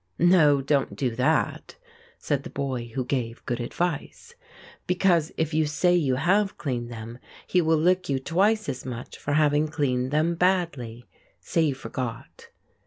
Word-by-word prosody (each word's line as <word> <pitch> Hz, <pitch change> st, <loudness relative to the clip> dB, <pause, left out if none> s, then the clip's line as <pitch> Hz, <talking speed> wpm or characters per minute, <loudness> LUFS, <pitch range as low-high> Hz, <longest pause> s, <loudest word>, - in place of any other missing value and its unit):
"No, 165 Hz, -5 st, +5 dB
don't 140 Hz, 0 st, 0 dB
do 125 Hz, -4 st, -2 dB
that," 150 Hz, +6 st, 0 dB, 0.4 s
said 145 Hz, -3 st, -1 dB
the -, -, -9 dB
boy 130 Hz, -4 st, -3 dB
who 130 Hz, -2 st, -1 dB
gave 120 Hz, -3 st, -3 dB
good 120 Hz, 0 st, -2 dB
advice, 175 Hz, -, -3 dB, 0.5 s
"because 180 Hz, -3 st, +2 dB
if 160 Hz, -1 st, -1 dB
you 155 Hz, 0 st, +2 dB
say 175 Hz, +4 st, +2 dB
you 145 Hz, -7 st, +2 dB
have 195 Hz, +8 st, +1 dB
cleaned 120 Hz, -5 st, -3 dB
them 115 Hz, +1 st, -8 dB, 0.3 s
he 180 Hz, -, +2 dB
will 160 Hz, -1 st, +2 dB
lick 180 Hz, +2 st, +2 dB
you 135 Hz, -, +1 dB
twice 200 Hz, +10 st, +1 dB
as 130 Hz, -3 st, -4 dB
much 125 Hz, -2 st, -7 dB
for 145 Hz, -, -2 dB
having 150 Hz, 0 st, +3 dB
cleaned 130 Hz, -5 st, -1 dB
them 155 Hz, +4 st, +1 dB
badly 165 Hz, -10 st, -1 dB, 0.3 s
say 165 Hz, -, -1 dB
you 150 Hz, -4 st, +1 dB
forgot." 130 Hz, -2 st, -7 dB
145 Hz, 160 wpm, -25 LUFS, 130-170 Hz, 0.5 s, No